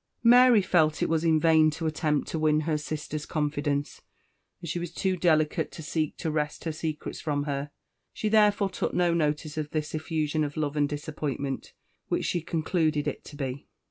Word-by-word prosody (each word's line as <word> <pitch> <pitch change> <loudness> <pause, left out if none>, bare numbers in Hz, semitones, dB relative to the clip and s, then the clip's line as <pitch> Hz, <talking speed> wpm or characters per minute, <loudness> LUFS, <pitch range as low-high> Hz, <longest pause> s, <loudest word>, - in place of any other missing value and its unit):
Mary 245 -2 +7
felt 160 -4 +2
it - - 0
was 160 0 +1
in 160 -2 +4
vain 160 -1 +5
to 155 +2 -5
attempt 155 -2 0
to 160 - -3
win 155 0 +3
her 155 0 0
sister's 150 0 -4
confidence, 145 -1 -2 0.6
and 175 - -8
she 165 +2 -2
was 175 -1 -5
too 190 +2 0
delicate 155 -3 +1
to 160 - -9
seek 155 0 -2
to 160 - -2
wrest 150 -1 -2
her 165 - -2
secrets 155 -1 -5
from 145 -2 -1
her; 140 0 -3 0.4
she 215 - -3
therefore 210 -2 +3
took - - -2
no 175 -1 +3
notice 150 -1 -1
of 150 -1 -3
this 155 -1 -3
effusion 155 -1 -1
of 145 0 -4
love 150 -1 -1
and 145 -1 +2
disappointment, 145 -2 -4 0.3
which - - -1
she 175 - 0
concluded 160 -2 0
it 145 - -4
to 145 - -11
be. 135 -1 -5
155 Hz, 190 wpm, -27 LUFS, 150-165 Hz, 0.6 s, Mary